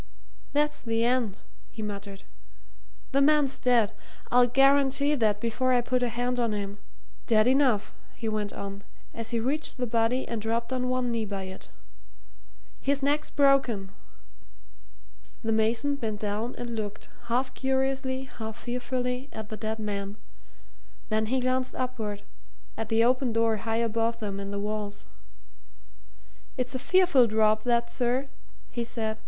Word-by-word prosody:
"That's 295 +1 +2
the 230 0 0
end!" 240 -5 0 0.3
he 220 - -7
muttered. 200 -1 -6 0.9
"The 275 0 +3
man's 290 -1 +4
dead! 240 -4 +3 0.4
I'll 245 0 +6
guarantee 275 +2 +4
that 215 -7 +2
before 235 +3 +1
I 245 - +4
put 250 +1 0
a 245 - +1
hand 245 +2 -1
on 230 -3 +1
him. 200 0 -4 0.5
Dead 215 -2 +5
enough!" 255 -5 +3 0.2
he 225 - -5
went 210 -2 -1
on, 200 0 -7 0.3
as 230 -1 -3
he 235 - 0
reached 280 +6 -1
the 250 - -1
body 230 +2 +1
and 230 -2 -3
dropped 230 +3 -1
on 250 -1 0
one 255 -1 0
knee 230 -2 -1
by 200 -2 -4
it. 190 - -9 1.1
"His 280 0 +1
neck's 295 +2 +1
broken." 270 -9 +3 1.5
The 225 - 0
mason 230 +6 +2
bent 220 -5 -3
down 215 +4 -2
and 240 -1 -5
looked, 210 -1 -5 0.2
half 250 +3 0
curiously, 265 0 0
half 220 -4 -7
fearfully, 250 +2 -3
at 215 -1 -7
the 215 - -5
dead 220 0 -3
man. 205 -1 -4 0.9
Then 215 0 +1
he 260 +3 +1
glanced 255 0 0
upward 220 -5 -3 0.5
at 225 0 -4
the 225 0 +4
open 250 0 +2
door 230 -1 +2
high 225 +2 -1
above 230 +1 0
them 200 -3 -4
in 200 0 -5
the 200 - -3
walls. 205 0 -4 1.5
"It's 255 0 -2
a 260 - -2
fearful 355 -7 +5
drop, 215 0 +3
that, 235 -1 +2
sir," 255 +2 0 0.4
he 240 - -2
said. 220 -2 -3
235 Hz, 150 wpm, -28 LUFS, 215-255 Hz, 1.5 s, I'll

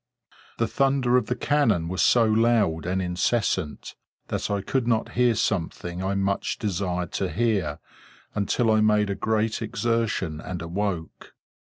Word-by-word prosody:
The 115 - +1
thunder 135 -3 +2
of 125 -4 +2
the 125 - -1
cannon 115 - +1
was 95 +2 -1
so 120 -2 +5
loud 110 -7 +2
and 95 +1 0
incessant, 90 -3 -1 0.4
that - - -2
I 100 -1 0
could 120 +5 -1
not 115 -2 +1
hear 125 -1 +3
something 90 -2 -2
I 95 +1 -1
much 100 0 -1
desired 90 -4 -2
to - - -2
hear, 95 -6 0 0.6
until 110 +3 +1
I 110 0 +4
made 105 -1 +3
a - - -2
great 110 +1 0
exertion 110 -7 -1
and 90 -1 -5
awoke. 90 -1 -4
105 Hz, 150 wpm, -25 LUFS, 90-115 Hz, 0.6 s, so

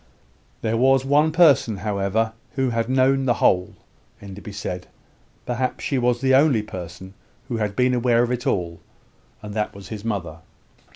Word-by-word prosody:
There 115 0 0
was 135 +2 +3
one 150 +3 +3
person, 145 - +4
however, 105 +2 0 0.2
who 130 -2 0
had 115 0 -1
known 135 +1 +2
the 120 -2 +2
whole, 90 -3 +2 0.4
Enderby 100 +1 -9
said; 90 -3 -5 0.6
perhaps 125 +1 -2
she 140 -3 0
was 120 0 +1
the 130 -1 +2
only 135 -5 +4
person 95 -1 -9 0.4
who 120 - -2
had 105 -2 -2
been 125 +2 +2
aware 120 -1 +3
of 120 - -1
it 125 -1 -2
all: 85 -3 -1 0.6
and 105 -1 -7
that 105 -1 -2
was 100 -1 -11
his 105 -2 -7
mother. 95 -8 -3
115 Hz, 165 wpm, -22 LUFS, 100-130 Hz, 0.6 s, person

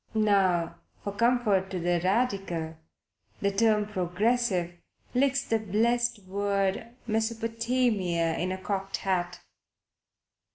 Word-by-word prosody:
Now 195 -6 +2 0.3
for 200 - -3
comfort 220 -4 +2
to 185 - -3
the 175 0 +1
Radical 190 -6 0 0.6
the 200 - +1
term 210 +1 +3
"Progressive" 190 -1 0 0.4
licks 275 +2 +2
the 225 - 0
blessed 225 +2 +1
word 200 +3 -1
Mesopotamia 225 -6 0
into 185 +2 -1
a - - -8
cocked 195 0 -3
hat. 180 -2 -2
200 Hz, 100 wpm, -28 LUFS, 185-230 Hz, 0.6 s, term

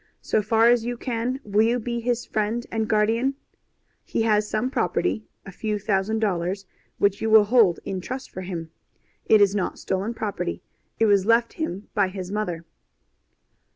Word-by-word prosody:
So 215 - +1
far 225 +2 +3
as 240 -1 +4
you 240 +1 -3
can, 245 +2 -2
will 205 +1 +2
you 230 +2 +3
be 235 0 -3
his 240 +1 -1
friend 220 +3 -1
and 220 -1 -1
guardian? 230 +5 +2 0.7
He - - -1
has 210 -1 +2
some 245 +4 -1
property 220 -4 -1 0.2
a 195 - -8
few 210 +3 -2
thousand 205 +1 0
dollars 195 -2 -1 0.3
which 200 0 +1
you 220 - 0
will 220 -1 +8
hold 205 -5 +4
in 190 -1 -3
trust 255 +7 -6
for 185 - -6
him. 170 -3 -6 0.6
It 215 -1 +6
is 200 -1 +5
not 205 -3 -2
stolen 195 +5 -2
property. 200 - -3 0.3
It 225 - +3
was 200 -2 +3
left 230 +1 +3
him 210 - -4
by 200 -3 +2
his 185 -1 -6
mother. 180 -6 -3
215 Hz, 175 wpm, -24 LUFS, 195-230 Hz, 0.7 s, will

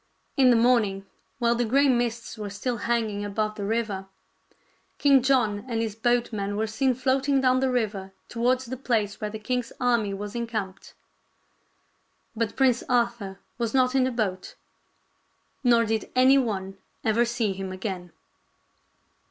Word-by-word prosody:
In 260 -2 +5
the 245 - +6
morning 225 -5 +2 0.3
while 235 -1 +2
the 240 +1 0
gray 275 +5 +3
mists 240 -3 0
were 210 -2 -5
still 235 +5 -3
hanging 220 -2 -1
above 215 +1 -2
the 205 -2 -5
river, 210 -3 -2 0.9
King 275 -2 +5
John 240 -6 +2
and 230 -2 -1
his 225 -2 -2
boat 240 +2 0
man 205 -1 -2
were 220 - +1
seen 250 +4 0
floating 270 +2 +1
down 255 -1 +3
the 265 0 +1
river 210 -6 -2 0.2
towards 250 +2 0
the 260 +2 -5
place 220 -6 -1
where 210 - -2
the 220 - -6
king's 245 +3 -2
army 235 -5 +1
was 205 +1 -6
encamped. 220 -5 -5 1.4
But 225 -1 -2
Prince 255 -3 +3
Arthur 235 -5 0 0.2
was 235 +1 -1
not 255 -1 +3
in 265 -1 +3
the 260 - 0
boat; 200 -6 -3 1.1
nor 235 -2 +4
did 220 0 -2
anyone 230 -8 +2 0.2
ever 225 +2 +3
see 235 -4 -1
him 190 0 -5
again. 185 -2 -5
230 Hz, 150 wpm, -26 LUFS, 205-250 Hz, 1.4 s, the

